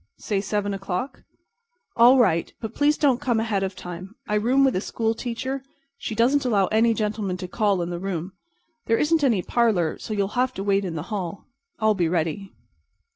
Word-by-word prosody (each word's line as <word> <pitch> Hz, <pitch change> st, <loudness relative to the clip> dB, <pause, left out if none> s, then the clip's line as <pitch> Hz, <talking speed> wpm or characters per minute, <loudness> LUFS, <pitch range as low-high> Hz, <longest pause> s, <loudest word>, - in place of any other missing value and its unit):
"Say 200 Hz, -2 st, -1 dB
seven 205 Hz, 0 st, -1 dB
o'clock." 195 Hz, +5 st, -4 dB, 0.7 s
"All 245 Hz, +3 st, +7 dB
right, 180 Hz, -9 st, +2 dB
but 220 Hz, -2 st, -6 dB
please 295 Hz, +1 st, +2 dB
don't 270 Hz, -4 st, +2 dB
come 240 Hz, -5 st, +1 dB
ahead 220 Hz, -3 st, 0 dB
of 190 Hz, 0 st, -2 dB
time. 180 Hz, +4 st, -8 dB
I -, -, -2 dB
room 245 Hz, +6 st, +3 dB
with 265 Hz, -2 st, +3 dB
a 185 Hz, -, 0 dB
school 225 Hz, +1 st, -1 dB
teacher, 245 Hz, +3 st, -3 dB
and 265 Hz, -, -14 dB, 0.4 s
she 220 Hz, -, -4 dB
doesn't 260 Hz, +6 st, +3 dB
allow 210 Hz, -6 st, +2 dB
any 225 Hz, +1 st, +3 dB
gentlemen 210 Hz, -4 st, -2 dB
to 180 Hz, 0 st, -6 dB
call 200 Hz, -2 st, +1 dB
in 170 Hz, -, -4 dB
the 175 Hz, -, -4 dB
room. 185 Hz, -1 st, -4 dB, 0.5 s
There 225 Hz, -, +3 dB
isn't 310 Hz, 0 st, +2 dB
any 225 Hz, -9 st, +2 dB
parlor, 210 Hz, -9 st, +1 dB
so 215 Hz, -, -5 dB
you'll 200 Hz, -1 st, 0 dB
have 255 Hz, +2 st, 0 dB
to 195 Hz, -, -4 dB
wait 200 Hz, 0 st, +1 dB
in 170 Hz, -3 st, -4 dB
the 165 Hz, +8 st, -5 dB
hall. 190 Hz, -2 st, -4 dB, 0.3 s
I'll 220 Hz, -1 st, +3 dB
be 175 Hz, -5 st, 0 dB
ready." 170 Hz, +3 st, -2 dB
210 Hz, 200 wpm, -24 LUFS, 190-235 Hz, 0.7 s, All